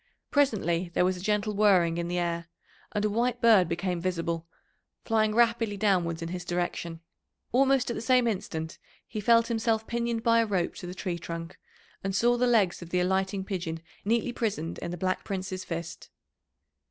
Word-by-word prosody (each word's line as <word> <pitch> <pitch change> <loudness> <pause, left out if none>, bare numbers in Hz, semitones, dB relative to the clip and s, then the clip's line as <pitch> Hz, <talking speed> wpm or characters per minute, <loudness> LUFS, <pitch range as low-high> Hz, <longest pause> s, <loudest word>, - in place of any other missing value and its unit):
Presently 190 - +1
there 180 - +4
was 185 0 +1
a 180 - -8
gentle 210 +2 0
whirring 185 -5 +4
in 170 - -2
the 175 +1 -2
air, 170 -1 -1 0.4
and 210 -1 0
a - - +2
white 240 +2 0
bird 215 -8 +5
became 175 0 -2
visible, 170 -2 -2 0.6
flying 215 -2 +2
rapidly 230 -3 +2
downwards 175 -5 +1
in 165 - -4
his 180 0 -4
direction. 175 -1 -3 0.5
Almost 270 0 +3
at - - -3
the - - -4
same 250 +1 +3
instant 160 -7 -3 0.3
he 215 - -5
felt 230 +2 +5
himself 225 -1 0
pinioned 235 -1 -2
by 230 -1 +4
a 230 - +3
rope 185 -4 0
to 180 - -7
the 180 - -6
tree 180 -2 -3
trunk, 165 0 -7 0.4
and 195 0 -2
saw 240 +4 +4
the 250 +1 +2
legs 210 -8 +3
of 170 - -9
the 180 - +1
alighting 190 +1 0
pigeon 170 -4 -3 0.2
neatly 235 +3 +1
prisoned 205 -9 -2
in 170 - -5
the 175 - -5
Black 185 +2 -1
Prince's 185 -1 -4
fist. 170 -1 -6
190 Hz, 185 wpm, -28 LUFS, 175-225 Hz, 0.6 s, bird